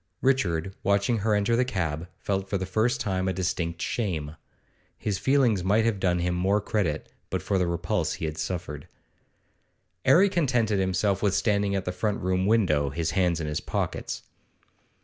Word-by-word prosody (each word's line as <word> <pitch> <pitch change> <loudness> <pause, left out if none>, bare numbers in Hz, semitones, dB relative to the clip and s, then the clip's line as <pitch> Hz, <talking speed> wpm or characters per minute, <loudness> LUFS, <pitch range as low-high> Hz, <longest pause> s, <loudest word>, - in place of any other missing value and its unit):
Richard, 95 -10 +1
watching 100 +3 +2
her 105 +1 +2
enter 105 +3 +2
the 125 - +3
cab, 85 -9 -2
felt 95 -1 -2
for 100 - 0
the 95 - -3
first 115 +6 +1
time 95 -5 -1
a 95 - +1
distinct 85 -2 -2
shame. 80 -10 -2 0.6
His 100 -3 -2
feelings 130 -8 +3
might 105 +4 +3
have 110 -4 +1
done 90 -2 +2
him 90 0 0
more 95 +4 +2
credit 95 -7 -2 0.2
but - - -2
for 95 - +1
the 90 - +1
repulse 85 0 -1
he - - -4
had 80 0 -4
suffered. 80 -3 -4 1.2
'Arry 170 +10 +6
contented 125 - +1
himself 95 +1 +1
with 100 -2 +2
standing 100 -1 +1
at 95 - -2
the 90 - -1
front 100 +3 -1
room 95 +1 0
window, 85 -11 +3
his 85 +2 -2
hands 90 -3 +1
in 80 - -3
his 75 0 -2
pockets. - - -3
95 Hz, 175 wpm, -26 LUFS, 90-110 Hz, 1.2 s, Arry